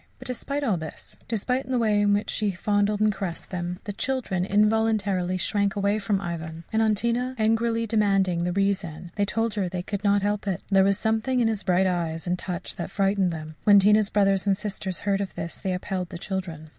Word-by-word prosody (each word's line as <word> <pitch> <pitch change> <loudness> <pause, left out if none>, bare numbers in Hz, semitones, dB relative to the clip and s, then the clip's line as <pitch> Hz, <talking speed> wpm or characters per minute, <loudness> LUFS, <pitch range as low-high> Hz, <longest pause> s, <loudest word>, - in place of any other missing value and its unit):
But - - -12
despite 275 +4 -3
all 215 -9 +1
this, 160 -2 -7
despite 250 +4 -1
the 255 - +1
way 215 -3 +2
in 205 0 +3
which 205 +1 0
he 210 -3 0
fondled 205 +2 +1
and 215 -1 +3
caressed 190 -3 -5
them, 175 -1 -3
the 205 - -5
children 235 -6 -1
involuntarily 205 -3 +2
shrank 200 +1 0
away 200 +1 +1
from 200 -1 0
Ivan; 165 -3 -5
and 220 - +3
on 220 -1 +3
Tina 240 +4 -1
angrily 225 +1 +1
demanding 195 -5 +2
the 180 - 0
reason, 180 -3 -1
they 205 -1 +1
told 225 +2 -1
her 200 -4 -1
they 180 0 -4
could 200 +2 -4
not 200 -1 +3
help 205 0 -1
it 190 -3 -2
there 195 -1 +5
was 195 0 +3
something 220 +4 0
in 235 - +3
his 220 -3 -1
bright 185 -1 +2
eyes 170 -3 -1
and 180 0 -1
touch 180 -2 -5
that 170 - -4
frightened 195 -2 +1
them. 155 -1 -6
When 205 -2 +7
Tina's 210 +1 +5
brothers 195 -1 +2
and 195 -1 +3
sisters 195 -3 -4
heard 200 -1 0
of 195 - -5
this, 170 0 -5
they 190 - -2
upheld 180 0 -3
the 175 - -6
children. 170 -5 -5
200 Hz, 215 wpm, -25 LUFS, 185-215 Hz, -, When